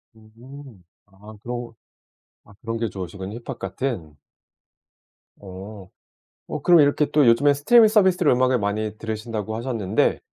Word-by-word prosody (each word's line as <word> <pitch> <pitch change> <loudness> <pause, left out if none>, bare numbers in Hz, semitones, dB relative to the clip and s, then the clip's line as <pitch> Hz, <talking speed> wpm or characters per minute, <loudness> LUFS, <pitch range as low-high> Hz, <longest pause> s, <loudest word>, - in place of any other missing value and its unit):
음. 115 0 -15 0.2
아 100 +2 -15
그런 120 0 -6 0.7
아 - - -19
그런 115 0 -4
게 115 -1 -1
좋으시군요 95 +2 -7
힙합 120 +1 -8
같은. 95 - -5 1.2
어. 95 0 -11 0.6
어 - - -5
그럼 175 -2 +6
이렇게 145 +1 +3
또 150 -3 +3
요즘에 140 +5 +4
스트리밍 220 +11 +5
서비스로 190 -7 +3
음악을 130 0 +2
많이 105 +1 -3
들으신다고 110 -1 -5
하셨는데 115 -4 -1
115 Hz, 290 characters per minute, -22 LUFS, 105-135 Hz, 1.2 s, 그럼